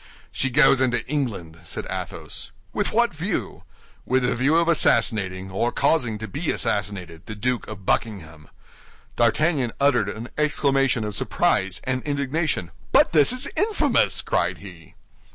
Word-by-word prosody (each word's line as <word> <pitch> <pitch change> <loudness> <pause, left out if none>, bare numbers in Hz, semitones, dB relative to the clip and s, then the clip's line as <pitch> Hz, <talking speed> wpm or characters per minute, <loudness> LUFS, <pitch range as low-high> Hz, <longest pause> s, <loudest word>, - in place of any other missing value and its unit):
"She 135 - -1
goes 135 0 +4
into 120 -2 0
England," 110 - -4
said 85 -1 -7
Athos. - - -6 0.2
"With - - -1
what - - +2
view?" - - -4 0.4
"With 130 +1 +1
the 125 - +1
view 135 +6 +2
of 170 0 +3
assassinating, 100 - +2
or 115 +5 0
causing 130 -6 +1
to 110 +1 -6
be 150 - -4
assassinated, 90 -5 -3
the 110 - -6
Duke 125 +3 -2
of 100 -3 -9
Buckingham." 80 -10 -2 0.7
D'Artagnan 125 +2 +1
uttered 125 -8 +2
an 110 +4 -7
exclamation 135 -5 +1
of 105 0 -4
surprise 95 -1 0
and 130 0 -2
indignation. 145 - -2 0.2
"But - - +5
this 150 +2 +6
is 255 +2 0
infamous!" 425 +1 +2
cried - - 0
he. - - -13
120 Hz, 145 wpm, -23 LUFS, 100-140 Hz, 0.7 s, this